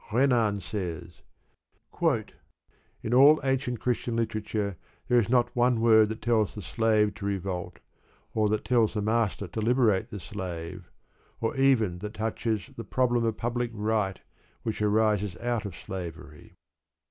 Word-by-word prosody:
Renan 115 -5 +2
says: 90 -3 -5 1.8
In 110 - -2
all 140 +5 +7
ancient 135 -3 0
Christian 120 -1 -1
literature 110 -3 -2 0.3
there 125 - +4
is 115 - -1
not 120 -1 +2
one 120 -1 +3
word 110 -2 +5
that 110 - -6
tells 110 -3 +1
the 105 - -7
slave 105 +2 +2
to 100 - -7
revolt, 95 -2 -3 0.6
or 110 -1 +2
that 110 0 -1
tells 115 -2 +2
the 105 - 0
master 110 -2 0
to 110 +6 -4
liberate 115 -4 +2
the 105 - -6
slave, 90 0 -6 0.5
or 115 +5 -1
even 120 -10 +2
that 105 +3 -7
touches 110 -2 -2
the 115 - -6
problem 120 +1 +1
of 115 -1 -1
public 120 +1 -1
right 105 -3 0 0.4
which 110 -2 -3
arises 105 -3 +1
out 120 -2 -2
of 100 -5 -6
slavery. 80 -5 -8
110 Hz, 145 wpm, -27 LUFS, 100-120 Hz, 1.8 s, all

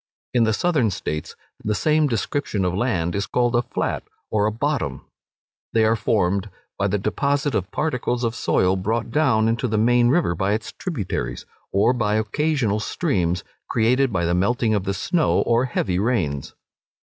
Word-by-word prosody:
In 120 -2 +4
the 110 - +2
Southern 145 -2 +2
States 75 -5 -4 0.3
the 105 0 0
same 155 +6 +2
description 115 -4 -1
of 90 - 0
land 90 -6 0
is 100 -1 -2
called 120 +4 +1
a 120 - +4
flat, - - -2 0.3
or 105 -1 +2
a - - 0
bottom. 145 +5 -2 0.7
They 110 -1 +4
are 110 +1 +3
formed 100 -2 0 0.3
by 100 - 0
the 100 +1 0
deposit 140 +8 0
of 95 -3 -1
particles 125 -5 -1
of 115 -1 0
soil 95 -5 +2
brought 110 +5 -2
down 120 -7 +3
into 115 +2 0
the 110 -1 0
main 120 +2 +4
river 150 - +2
by 95 +4 0
its 110 +2 -3
tributaries, 140 - -4 0.3
or 100 +6 +3
by 105 -4 0
occasional 110 0 0
streams 90 - -1 0.3
created 125 +3 +2
by 85 -4 0
the 85 - +1
melting 110 +5 +1
of 100 -3 0
the 100 -1 -1
snow, 160 - +1
or 120 +2 +2
heavy 95 -7 -1
rains. 90 - -1
110 Hz, 170 wpm, -22 LUFS, 100-125 Hz, 0.7 s, In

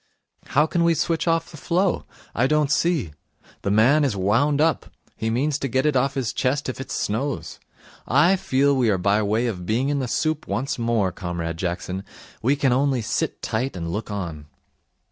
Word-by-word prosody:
'How 150 +3 +3
can 170 +2 0
we 170 0 +3
switch 165 +1 0
off 165 +1 +1
the 155 - -10
flow? 180 +4 0 0.3
I 125 +3 +2
don't 150 -1 +2
see. 150 - +1 0.5
The - - -2
man 120 +9 +4
is 130 -7 +1
wound 120 +10 +2
up. 160 -1 +2 0.3
He 110 - -2
means 140 +5 0
to 135 - -2
get 130 +3 0
it 150 -2 +2
off 135 +2 +1
his 130 -5 -1
chest 140 +3 0
if 130 0 -4
it 135 - -8
snows. 105 - -3 0.5
I 150 +10 +4
feel 140 -5 +2
we 125 -4 +2
are 100 - +2
by 100 +3 +2
way 110 +3 +1
of 90 -7 -4
being 125 +6 +1
in 145 -1 0
the 130 - -2
soup 155 +4 -1
once 130 +8 -2
more, 115 -5 +1
Comrade 85 -2 -4
Jackson. 90 +2 -3 0.4
We 135 +5 +2
can 140 -3 +2
only 130 -2 +1
sit - - -2
tight 125 +3 -2
and 85 -2 -4
look 105 +4 -4
on.' 85 -8 -5
130 Hz, 195 wpm, -23 LUFS, 105-145 Hz, 0.5 s, man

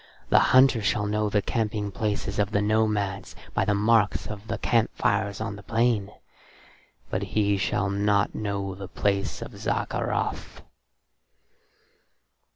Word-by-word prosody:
The - - +6
hunter 130 -2 +5
shall 105 +1 0
know 105 0 0
the 105 -1 +1
camping 105 -2 -2
places 105 0 -2
of 100 -1 +2
the 100 -1 +1
nomads 105 -2 0 0.2
by - - +1
the 105 - +2
marks 105 0 +2
of 105 0 -8
the - - -2
camp 115 -2 +2
fires 100 -1 0
on 105 -2 -4
the - - -10
plain, 115 -2 +1 1.0
but - - -1
he 100 -1 +1
shall 95 0 0
not 100 0 +1
know 100 -2 -3
the 95 0 -8
place 100 +1 -1
of - - -9
Zaccarath." - - -2
105 Hz, 140 wpm, -26 LUFS, 100-110 Hz, 1.0 s, The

